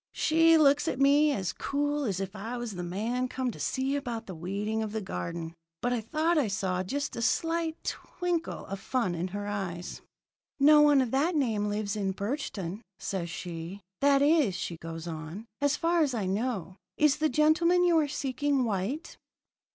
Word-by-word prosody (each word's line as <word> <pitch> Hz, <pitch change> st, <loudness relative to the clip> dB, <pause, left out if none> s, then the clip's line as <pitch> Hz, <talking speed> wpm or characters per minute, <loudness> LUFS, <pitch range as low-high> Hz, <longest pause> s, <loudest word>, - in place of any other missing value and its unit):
"She 330 Hz, +1 st, +5 dB
looks 285 Hz, -2 st, +4 dB
at 255 Hz, -, -1 dB
me 290 Hz, +2 st, +5 dB
as 190 Hz, -9 st, -2 dB
cool 290 Hz, +1 st, -1 dB
as 195 Hz, -5 st, -1 dB
if 195 Hz, +1 st, -4 dB
I 225 Hz, +5 st, -5 dB
was 240 Hz, -2 st, -4 dB
the 180 Hz, -, -5 dB
man 220 Hz, +8 st, -2 dB
come 255 Hz, -1 st, -2 dB
to -, -, -11 dB
see 265 Hz, +2 st, -1 dB
about 240 Hz, -5 st, -4 dB
the 190 Hz, -, -7 dB
weeding 200 Hz, +6 st, -2 dB
of 215 Hz, -1 st, -4 dB
the 220 Hz, -, -1 dB
garden, 165 Hz, -, -5 dB, 0.3 s
but 245 Hz, 0 st, 0 dB
I 240 Hz, -, 0 dB
thought 315 Hz, +8 st, +1 dB
I 270 Hz, -, +1 dB
saw 190 Hz, -3 st, -1 dB
just 280 Hz, +10 st, -3 dB
a 235 Hz, -, -4 dB
slight 330 Hz, +5 st, 0 dB
twinkle 350 Hz, -2 st, -3 dB
of 195 Hz, 0 st, -6 dB
fun 230 Hz, -4 st, -1 dB
in 170 Hz, +2 st, -2 dB
her 205 Hz, +2 st, -5 dB
eyes. 190 Hz, -4 st, -4 dB, 0.6 s
"'No 300 Hz, +2 st, +7 dB
one 290 Hz, -2 st, +6 dB
of 250 Hz, -3 st, -1 dB
that 310 Hz, +6 st, +1 dB
name 220 Hz, -8 st, +1 dB
lives 205 Hz, 0 st, -2 dB
in 195 Hz, -2 st, -1 dB
Birchton,' 200 Hz, -, -4 dB, 0.2 s
says 180 Hz, -3 st, -3 dB
she. 170 Hz, +3 st, -6 dB, 0.2 s
'That 280 Hz, 0 st, +4 dB
is,' 290 Hz, -, +4 dB
she 180 Hz, -1 st, -4 dB
goes 165 Hz, 0 st, -7 dB
on, 165 Hz, +5 st, -6 dB, 0.2 s
'as 285 Hz, +1 st, +2 dB
far 335 Hz, 0 st, +2 dB
as 280 Hz, -5 st, +1 dB
I 210 Hz, -4 st, -1 dB
know. 195 Hz, -2 st, -2 dB, 0.2 s
Is 300 Hz, -2 st, +4 dB
the 310 Hz, 0 st, +2 dB
gentleman 335 Hz, +4 st, +4 dB
you 345 Hz, -2 st, +5 dB
are 300 Hz, -, +1 dB
seeking 275 Hz, 0 st, 0 dB
white?' 225 Hz, -, -3 dB
240 Hz, 190 wpm, -29 LUFS, 195-290 Hz, 0.6 s, No